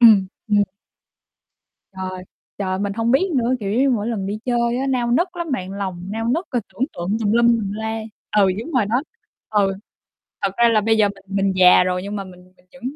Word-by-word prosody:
Ừm, 215 -5 +7 0.2
ừm. 205 -1 +4 1.3
Trời, 185 -1 -5 0.4
trời, 185 -2 -1
mình 200 0 -1
hông 230 +2 0
biết 335 +9 +3
nữa. 245 0 +2
Kiểu 200 -1 -3
giống 230 - +1
như 275 - +3
mỗi 220 -3 0
lần 210 -5 -2
đi 205 +2 -3
chơi 240 -1 +1
á, 270 - -1
nao 245 -2 0
nức 355 +8 +1
lắm 340 -2 -4
bạn, 190 -6 -3
lòng 190 -3 -4
nao 225 +1 -3
nức 330 +9 0
rồi 245 -3 0
tưởng 260 - 0
tượng 185 +5 -2
tùm 210 -2 0
lum 235 +1 +4
tùm 225 -4 +2
la. 220 +1 -3 0.4
Ừ, 200 -2 +5
đúng 325 +8 -7
rồi 255 -6 +3
đó. 245 +6 +1 0.5
Ừ, 200 -2 +2 0.7
thật 195 - +1
ra 235 0 +6
là 225 -2 +4
bây 225 +1 +2
giờ 210 -1 +5
mình 195 -1 -10
mình 195 -1 +2
già 180 -1 +7
rồi, 180 0 -1
nhưng 205 +1 -5
mà 195 - -4
mình 180 0 -15
mình 180 - -28
vẫn, 270 - -16
215 Hz, 225 wpm, -21 LUFS, 195-235 Hz, 1.3 s, Ừm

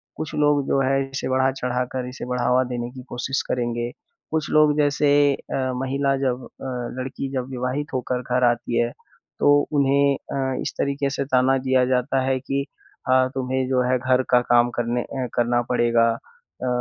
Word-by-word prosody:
कुछ 155 - -5
लोग 145 -2 +2
जो 135 - +2
हैं 135 +1 +2
इसे 135 -1 -4
बढ़ा-चढ़ाकर 130 -1 -1
इसे 125 - -7
बढ़ावा 125 +1 +1
देने 120 0 -3
की 130 -1 -10
कोशिश 130 +2 -2
करेंगे। 120 -1 -1 0.4
कुछ 160 -2 -1
लोग 150 -1 +4
जैसे 145 0 +2 0.2
अ, 130 -1 -3
महिला 135 +1 0
जब 130 -2 -1
अ, - - -13 0.3
लड़की 135 +1 -4
जब 130 0 -3
विवाहित 130 +3 -3
होकर 125 -1 -1
घर 125 0 0
आती 120 0 +1
है, 120 0 +1 0.5
तो 145 - +5 0.2
उन्हें 140 -1 +3 0.2
अ, 130 -1 -1
इस - - -3
तरीके 140 0 0
से 140 0 -2
ताना 130 0 +3
दिया 130 -1 +2
जाता 130 +1 +1
है 130 -1 +1
कि 135 +1 -2 0.5
अ, 130 0 +5
तुम्हें 130 0 -1
जो 130 -1 +2
है 130 - +3
घर 130 0 +2
का 125 -1 +5
काम 120 0 +5
करने 120 +1 0
अ, 130 0 -4
करना 120 0 +2
पड़ेगा 120 -1 +3
अ, 475 - -10
130 Hz, 175 wpm, -23 LUFS, 125-135 Hz, 0.5 s, तो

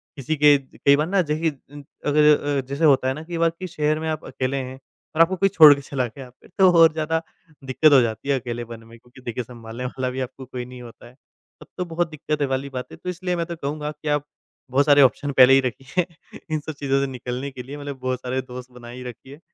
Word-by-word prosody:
किसी 150 +2 -2
के 145 0 +6
ज 135 -1 -17
कई 140 - +7
बार 150 +2 0
ना 195 +1 +2
जै 150 -3 -2
है 160 - +4 0.2
उम, 145 - -10 0.2
अगर 150 -1 +3
अ, 135 - +1
जैसे 140 +5 -2
होता 135 -3 +4
है 130 - +1
ना 155 +4 -8
कि 170 0 -5
बाकी 165 +2 0
शहर 155 -2 0
में 160 - -4
आप 155 -1 -4
अकेले 130 +1 -3
हैं 130 0 -6 0.4
और 160 - +4
आपको 180 +3 +4
कोई 195 +1 +3
छोड़ 155 -6 +9
के 140 - -8
चला 135 -2 -2
गया 125 +3 -11
फिर 125 - -22
तो 190 -1 +7
और 165 -1 +7
ज़्यादा 160 +1 -1 0.4
दिक्कत 135 +4 +3
हो 135 - +8
जाती 115 +3 -3
है, 135 -1 +2
अकेलेपन 120 -1 -7
में 115 +1 -15
क्योंकि 125 +2 -18
देखिए 120 0 -4
सँभालने 120 +1 -8
वाला 130 0 -3
भी 130 +1 -5
आपको 130 +1 -7
कोई 125 -1 -6
नहीं 125 0 -11
होता 120 0 -13
है। 120 - -17 0.5
तब - - -13
तो 180 - -2
बहुत 170 0 -2
दिक्कतें 150 -1 -2
वाली 135 +1 -2
बात 125 -2 -5
है - - -10
तो 180 - -6
इसलिए 180 0 -2
मैं 170 - -2
तो 170 0 -6
कहूँगा 150 0 -4
कि 150 0 -11
आप 145 -1 0 0.5
बहुत 140 +2 +3
सारे 145 -1 +6
ऑप्शन 140 +2 +3
पहले 130 +1 +8
ही 135 - +7
रखिए, 135 +8 -2 0.5
इन 155 - 0
सब 155 +1 -7
चीज़ों 135 -1 +1
से 140 - 0
निकलने 125 +2 -5
के 130 -2 -8
लिए, 140 +4 -8
मतलब 145 -2 -7
बहुत 130 -1 -2
सारे 130 +1 -2
दोस्त 125 0 -10
बनाई 125 +1 -10
रखिए। 130 +4 -10
140 Hz, 250 wpm, -23 LUFS, 125-155 Hz, 0.5 s, छोड़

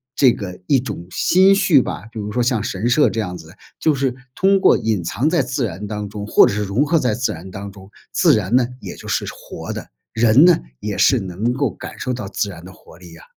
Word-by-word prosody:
这 130 -4 +5
个 90 -3 -7
一 140 - +4
种 90 -9 -7
心 190 +2 +4
绪 165 -8 +4
吧。 115 - -6
比 110 - -7
如 105 0 -4
说 125 - 0
像 120 -3 +1
神 105 0 -2
社 145 +5 +4
这 115 - -4
样 90 -4 -5
子， 80 +1 -13 0.3
就 155 - +2
是 135 -2 0 0.2
通 195 +1 +3
过 - - +5
隐 110 -4 -1
藏 125 - 0
在 170 -2 +2
自 125 0 -2
然 100 0 -6
当 105 -1 -5
中， 105 0 -6
或 - - +6
者 - - -1
是 105 +1 -1
融 105 +9 0
合 165 +2 +2
在 125 -5 0
自 125 +3 -1
然 90 +4 -8
当 100 +1 -7
中。 95 -1 -15 0.2
自 - - +4
然 105 0 -2
呢， 125 -2 +2
也 - - -7
就 - - -11
是 - - -1
活 - - -8
的， - - -6 0.2
人 115 +4 +5
呢， 175 -1 +6 0.2
也 105 -1 -4
是 130 - +4
能 95 +6 -2
够 135 +2 0
感 - - -10
受 130 - -3
到 120 -5 -5
自 100 +1 -2
然 85 -2 -10
的 95 - -11
活 - - -18
力 90 -2 -14
啊。 85 - -15
110 Hz, 270 characters per minute, -19 LUFS, 100-130 Hz, 0.3 s, 或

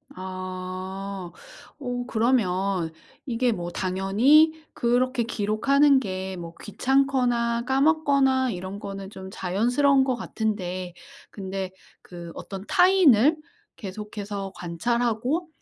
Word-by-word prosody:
아. 185 0 -6 0.5
어 245 -3 -3
그러면 195 -7 +1 0.3
이게 245 -1 +1
뭐 175 -5 -3
당연히 210 - +4 0.2
그렇게 245 +1 +1
기록하는 265 +6 +3
게 190 -6 -4 0.2
뭐 170 -1 -8
귀찮거나 245 -1 +1
까먹거나 270 -2 +3
이런 190 +1 -6
거는 195 -1 -7
좀 190 -2 -9
자연스러운 245 +10 +2
것 260 -2 0
같은데. 185 -6 -3 0.4
근데 190 -1 -5 0.3
그 170 -1 -10
어떤 195 0 -7
타인을 330 - +5 0.4
계속해서 205 -1 -6
관찰하고 240 - -1
220 Hz, 225 characters per minute, -25 LUFS, 190-260 Hz, 0.5 s, 타인을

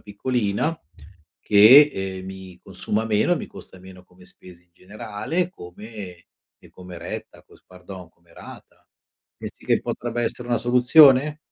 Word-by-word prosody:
piccolina 105 +6 -3 0.6
che, 120 +9 +7
ehm, 95 -1 -6
mi 95 -1 -11
consuma 110 +2 -4
meno, 110 +10 +1
mi - - -7
costa 95 - -14
meno 95 0 -15
come 90 0 -21
spese 90 -1 -14
in 90 - -42
generale, 105 - -5
come 105 - -13 0.6
ehm, - - -20
come 90 -1 -12
retta 85 +1 -9
cos - - -23
pardon, 90 -1 -13
come 85 0 -29
rata. - - -15 0.5
Pensi - - -11
che - - +1
potrebbe 120 0 -5
essere 120 +1 -4
una 120 -1 0
soluzione? 130 +4 +4
105 Hz, 140 wpm, -22 LUFS, 90-125 Hz, 0.6 s, che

